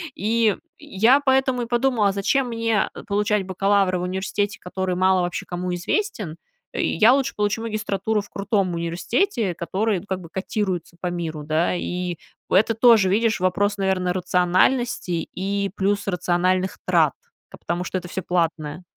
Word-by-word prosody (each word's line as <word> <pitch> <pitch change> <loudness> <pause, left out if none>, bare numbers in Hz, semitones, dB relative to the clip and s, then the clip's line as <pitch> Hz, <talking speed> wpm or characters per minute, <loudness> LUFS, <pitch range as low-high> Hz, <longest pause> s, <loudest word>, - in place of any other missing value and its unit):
И 220 0 +1 0.2
я 260 -2 +3
поэтому 265 -2 +2
и - - -3
подумала, 240 -3 +2
а - - +1
зачем 245 +7 +1
мне, 230 -3 0
э, - - -9
получать 205 -1 +1
бакалавра 195 -1 +1
в - - -3
университете, 190 +2 -2
который 185 0 -3
мало 185 0 +3
вообще 175 -1 -3
кому 180 0 -4
известен. 180 - -2 0.4
Я 220 +9 +4
лучше 275 -1 0
получу 210 +2 0
магистратуру 215 -1 -1
в 205 - -14
крутом 200 -2 -1
университете, 190 - -1
который 190 +2 -1
как 190 -2 -3
бы 165 - -11
котируется 190 -2 -3
по 180 - -2
миру, 165 -3 -4
да. 155 +4 +1
И 180 0 -3 0.3
у - - -3
это 220 +4 +4
тоже, 225 -4 +5
видишь, 220 +2 +2
вопрос, 205 +3 +1
наверно, 190 -2 0
рациональности 180 +1 +1
и 200 +1 -2
плюс 200 +1 0
рациональных 185 0 0
трат, 165 -6 +3 0.4
ка - - -12
потому 170 +2 -3
что 185 - -3
это 180 - -6
всё 190 +1 -4
платное. 165 -2 -2
190 Hz, 160 wpm, -23 LUFS, 180-215 Hz, 0.4 s, тоже